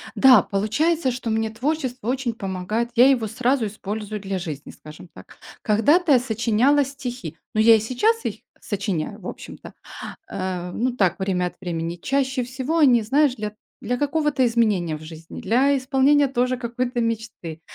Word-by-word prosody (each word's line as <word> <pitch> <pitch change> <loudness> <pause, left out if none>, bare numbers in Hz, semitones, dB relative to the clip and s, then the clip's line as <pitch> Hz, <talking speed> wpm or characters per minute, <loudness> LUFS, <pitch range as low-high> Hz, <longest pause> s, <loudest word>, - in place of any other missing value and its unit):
Да, 255 -6 +7
получается, 260 +9 0
что 245 -1 -5
мне 220 0 0
творчество 255 0 -3
очень 255 -1 -1
помогает, 205 +3 -3
я 250 +3 +7
его 240 -5 +2
сразу 250 +3 0
использую 210 +1 -5
для 195 -1 -3
жизни, 155 -5 -7
скажем 155 +3 -13
так. - - -15 0.2
Когда-то 290 - +3
я 255 - +6
сочиняла 245 +4 +2
стихи, 250 - -7 0.2
ну, 215 - 0
я 225 +1 +7
и - - +2
сейчас 425 - +1
их - - -2 0.3
сочиняю, 200 -2 -3
в 185 - -9
общем-то, - - -9 0.6
э, 185 -2 -4
ну, 250 +6 0
так, 190 -4 +1
время 185 -2 0
от 180 - -5
времени. 170 -2 -3
Чаще 265 +6 -1
всего, 260 +6 -2
они, 255 -7 +5
знаешь, 270 +4 +2
для 210 -1 -5 0.3
для 245 +3 -2
какого-то 295 -2 +1
изменения 210 -9 +1
в 155 - -12
жизни, 160 +1 -10
для 270 +5 +3
исполнения, 270 +2 +3
тоже, 255 0 0
какой-то 245 0 -3
мечты. 225 -8 -4
235 Hz, 160 wpm, -23 LUFS, 200-265 Hz, 0.6 s, Да